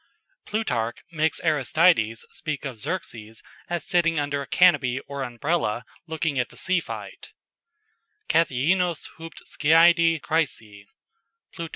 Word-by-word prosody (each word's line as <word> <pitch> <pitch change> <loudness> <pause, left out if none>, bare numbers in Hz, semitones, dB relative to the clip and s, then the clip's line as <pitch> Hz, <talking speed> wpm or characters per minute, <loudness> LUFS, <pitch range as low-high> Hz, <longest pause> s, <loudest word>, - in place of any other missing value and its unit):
"] - - -44
Plutarch 125 - -1
makes 160 -1 0
Aristides 150 -6 +2
speak 150 -1 -5
of 125 -5 -6
Xerxes 115 - -5 0.3
as 175 -3 -3
sitting 165 -2 +2
under 145 -1 -2
a - - -7
canopy 135 -8 +3
or 140 0 -7
Umbrella 125 -2 -1 0.2
looking 160 -3 -1
at 125 - -1
the - - -14
sea 185 0 +1
fight - - -8 1.0
"kathaeenos 165 +3 +1
hupd 165 0 -10
skiadi 165 +1 +4
chrysae." 115 -11 -2 0.7
_Plut. 165 -2 -5
155 Hz, 125 wpm, -24 LUFS, 125-170 Hz, 1.0 s, skiadi